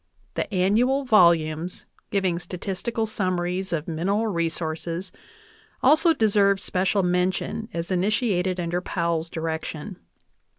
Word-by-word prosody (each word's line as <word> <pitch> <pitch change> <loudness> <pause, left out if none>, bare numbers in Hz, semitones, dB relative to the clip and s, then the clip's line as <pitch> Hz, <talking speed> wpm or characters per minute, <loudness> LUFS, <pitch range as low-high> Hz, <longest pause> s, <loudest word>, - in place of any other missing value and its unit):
The - - -3
annual 220 +9 +2
volumes 170 -6 +3 0.2
giving 185 -4 0
statistical 195 +5 -3
summaries 185 -3 -2
of 160 -2 -2
mineral 190 +7 0
resources 170 -1 -2 0.7
also 310 +5 +6
deserve 200 -7 +3
special 190 0 0
mention 180 +5 -1
as 170 +2 -4
initiated 185 -1 +1
under 175 +1 -1
Powell's 170 -3 -1
direction. 160 +2 -4
185 Hz, 100 wpm, -24 LUFS, 170-205 Hz, 0.7 s, also